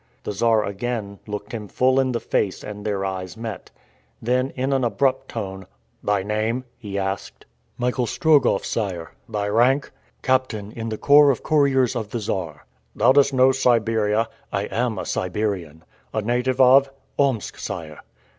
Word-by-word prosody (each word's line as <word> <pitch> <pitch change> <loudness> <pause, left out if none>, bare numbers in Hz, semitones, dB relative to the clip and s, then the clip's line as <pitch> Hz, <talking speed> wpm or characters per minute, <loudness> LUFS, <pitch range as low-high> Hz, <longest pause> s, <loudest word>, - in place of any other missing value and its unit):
The - - -3
Czar 110 +1 +2
again 100 -1 -4
looked 105 0 -6
him 110 -3 -5
full 130 +5 +2
in 130 -1 +2
the 120 - -1
face 100 -3 -1
and 105 -1 -7
their 100 -2 -1
eyes 95 0 -5
met. 110 -4 -6 0.5
Then 125 +3 +1
in 130 +2 0
an 135 -1 +1
abrupt 130 +4 +1
tone, 95 -4 -5 0.4
"Thy 100 -2 +1
name?" 110 +4 -1 0.2
he 100 -4 -5
asked. 95 0 -4 0.3
"Michael 125 0 0
Strogoff, 145 -10 +3
sire." 90 -7 -3 0.2
"Thy 105 -1 -2
rank?" 125 +7 +2 0.3
"Captain 130 -6 0
in 115 0 -5
the 110 - -3
corps 145 +3 +6
of 130 - 0
couriers 135 -5 +3
of 110 -4 -3
the 120 - -3
Czar." 90 -8 -4 0.3
"Thou 120 +4 +5
dost 140 0 +5
know 130 0 +5
Siberia?" 115 -4 +2 0.2
"I 100 0 -1
am 115 +1 0
a - - -4
Siberian." 90 -5 -2 0.3
"A 110 - 0
native 125 +3 0
of?" 135 +1 +6 0.3
"Omsk, 135 -6 0
sire." 75 -2 -6
115 Hz, 160 wpm, -23 LUFS, 100-130 Hz, 0.5 s, corps